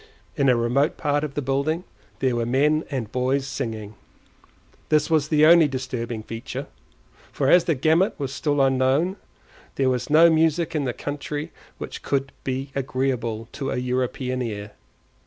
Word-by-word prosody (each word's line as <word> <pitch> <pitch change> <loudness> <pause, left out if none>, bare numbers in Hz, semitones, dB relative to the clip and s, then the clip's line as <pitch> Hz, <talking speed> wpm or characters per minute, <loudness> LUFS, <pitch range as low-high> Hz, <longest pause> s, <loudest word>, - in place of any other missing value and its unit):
In 140 -1 +2
a 125 - +5
remote 120 +6 +1
part 145 0 0
of 150 -2 -5
the 145 - -2
building 140 +6 0 0.4
there 130 -2 +2
were 120 - 0
men 150 +5 +2
and 125 -7 -4
boys 130 +2 0
singing; 110 -6 -5 1.0
this 150 0 +2
was 155 -2 +3
the 155 -1 +4
only 165 -1 +7
disturbing 125 -4 -4
feature, 115 +1 -6 0.7
for 135 -1 +1
as 175 -1 +6
the 165 - +1
gamut 160 +8 +2
was 135 -1 -3
still 145 -3 0
unknown, 135 +8 +2 0.6
there 130 -1 +2
was 125 -2 -2
no 160 +3 +7
music 160 0 +2
in 150 -3 -1
the 125 - 0
country 145 +2 -5 0.3
which - - -7
could 135 -1 -1
be 135 +1 -3
agreeable 125 -4 -2
to 135 -2 -4
a - - -2
European 125 0 -2
ear. 105 -3 -5
135 Hz, 160 wpm, -24 LUFS, 125-150 Hz, 1.0 s, only